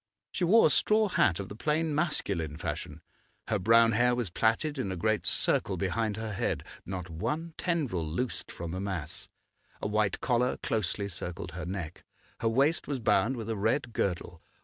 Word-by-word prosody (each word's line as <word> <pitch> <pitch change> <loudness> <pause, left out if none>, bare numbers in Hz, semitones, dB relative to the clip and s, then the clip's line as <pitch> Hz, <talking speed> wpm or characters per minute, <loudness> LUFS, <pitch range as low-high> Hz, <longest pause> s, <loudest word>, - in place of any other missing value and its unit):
She 185 - -2
wore 215 +7 +6
a - - +5
straw 215 0 +3
hat 95 - +3
of 100 - -4
the 100 - -8
plain 155 +6 0
masculine 100 - -1
fashion; - - -5 0.5
her 105 - +1
brown 115 +3 +5
hair 120 +2 +3
was 120 -7 -2
plaited 135 - +1
in 100 -7 -1
a - - -2
great 110 +4 0
circle - - +2
behind 110 -2 -1
her 110 -1 -4
head, 95 - -1 0.2
not 90 -2 -4
one 150 - -3
tendril 150 - -1
loosed 115 +11 -3
from 85 -1 -6
the 95 - -3
mass; 95 -3 -3 0.5
a - - -5
white 105 -2 +1
collar 125 0 +1
closely 100 -2 -1
circled 90 -2 -6
her 85 +1 -6
neck; 90 -3 -5 0.4
her 115 - +1
waist 140 +8 +2
was 140 -3 -2
bound 120 +2 +2
with 110 -2 -5
a 115 - -1
red 115 +4 0
girdle. 90 -4 -2
110 Hz, 180 wpm, -30 LUFS, 95-130 Hz, 0.5 s, wore